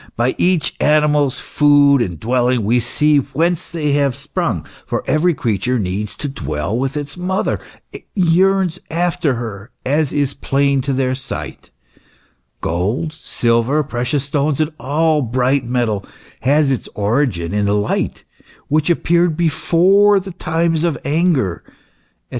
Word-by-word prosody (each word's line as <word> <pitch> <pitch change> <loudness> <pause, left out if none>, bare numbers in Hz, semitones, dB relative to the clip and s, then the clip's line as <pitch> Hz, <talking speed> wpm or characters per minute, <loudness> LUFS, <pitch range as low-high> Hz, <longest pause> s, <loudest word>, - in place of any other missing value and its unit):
By 120 +3 +1
each 180 -3 +2
animal's 150 -2 +2
food 145 -2 +4
and 85 -8 -3
dwelling 125 0 +1
we 115 +4 +2
see 150 +5 +2
whence 165 +5 -1
they 150 -3 -1
have 140 -3 +1
sprung, - - -3 0.2
for - - -3
every 165 +2 +2
creature 120 +1 -1
needs 100 0 -3
to 145 - -4
dwell 80 - -3
with 135 +4 -2
its 145 +3 -6
mother, 185 +2 -1 0.3
and - - -8
yearns 185 0 +2
after 170 -3 0
her, 110 -2 -6 0.2
as 145 +2 +1
is 145 -1 0
plain 140 0 +1
to 135 +2 -2
the 130 -1 0
sight," 130 - -7 0.5
" - - -40
Gold, 105 - -2
silver, 120 +6 +1
precious 130 +1 -2
stones, 145 +1 -1
and 155 0 0
all 150 +4 +1
bright 130 +2 0
metal, 115 -5 -1 0.4
has 140 +1 +2
its 130 - -3
origin 105 - 0
in 105 0 +1
the 100 +1 +1
light, 105 - -2 0.5
which 155 +3 +1
appeared 170 -1 +2
before 185 +5 +3
the 190 0 -8
times 165 -1 -1
of 170 -4 0
anger," 145 - +1
&c. - - -24
140 Hz, 145 wpm, -18 LUFS, 120-160 Hz, 0.5 s, food